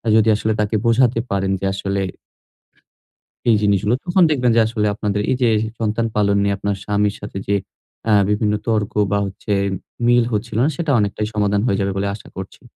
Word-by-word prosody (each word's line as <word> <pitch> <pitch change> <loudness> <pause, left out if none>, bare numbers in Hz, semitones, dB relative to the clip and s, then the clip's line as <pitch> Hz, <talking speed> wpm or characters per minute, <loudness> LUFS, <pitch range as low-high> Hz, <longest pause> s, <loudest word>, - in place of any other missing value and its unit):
যদি 110 0 +4
আসলে 110 +1 0
তাকে 105 +1 -1
বোঝাতে 115 0 +3
পারেন 95 -1 0
যে 95 - -3
আসলে 100 0 -2 1.5
এই 110 - +5
জিনিসগুলো 100 +2 +2
তখন 180 +1 +3
দেখবেন 125 -5 +2
যে - - +6
আসলে 110 -1 -1
আপনাদের 105 0 -2
এই 130 - +2
যে 120 - +5 0.3
সন্তান 115 +1 0
পালন 100 -1 +2
নিয়ে 100 0 +1
আপনার 100 0 -2
স্বামীর 105 0 +1
সাথে - - -6
যে 100 - +2 0.6
আ - - +4 0.2
বিভিন্ন 105 0 +1
তর্ক 110 -3 0 0.2
বা 100 - +3
হচ্ছে 100 +2 -5 0.5
মিল 120 0 +4
হচ্ছিল 110 +1 -2
না - - +3
সেটা 165 -1 -2
অনেকটাই 105 0 -1
সমাধান 105 -1 +1
হয়ে 100 -4 +1
যাবে 100 0 0
বলে 100 +1 -1
আশা 100 - -11
করছি। 95 +5 -8
105 Hz, 185 wpm, -20 LUFS, 100-115 Hz, 1.5 s, যে